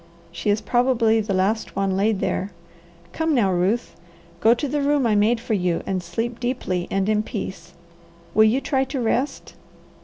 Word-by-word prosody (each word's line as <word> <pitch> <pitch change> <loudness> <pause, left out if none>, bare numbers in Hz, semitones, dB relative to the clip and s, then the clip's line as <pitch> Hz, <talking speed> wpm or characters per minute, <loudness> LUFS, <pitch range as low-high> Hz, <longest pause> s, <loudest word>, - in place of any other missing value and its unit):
She 170 +4 -3
is 205 +1 +2
probably 240 -3 +2
the 205 -2 -2
last 200 +4 0
one 195 -1 0
laid 200 +1 +1
there. 190 - -1 0.6
Come 320 -2 0
now, 205 -7 +3
Ruth. 185 +7 0 0.4
Go 225 +5 +5
to 290 +4 -3
the 290 +2 -1
room 285 -2 +2
I 225 - +2
made 215 +3 +3
for 230 -1 -3
you, 180 -4 0
and 190 -1 -2
sleep 225 +8 -4
deeply 240 -8 -2
and 195 0 0
in 215 0 +2
peace. 190 -6 -7 0.6
Will 220 +1 +6
you 240 +5 +2
try 265 -2 +1
to 270 0 -4
rest?" 250 +4 -1
220 Hz, 180 wpm, -23 LUFS, 195-245 Hz, 0.6 s, Will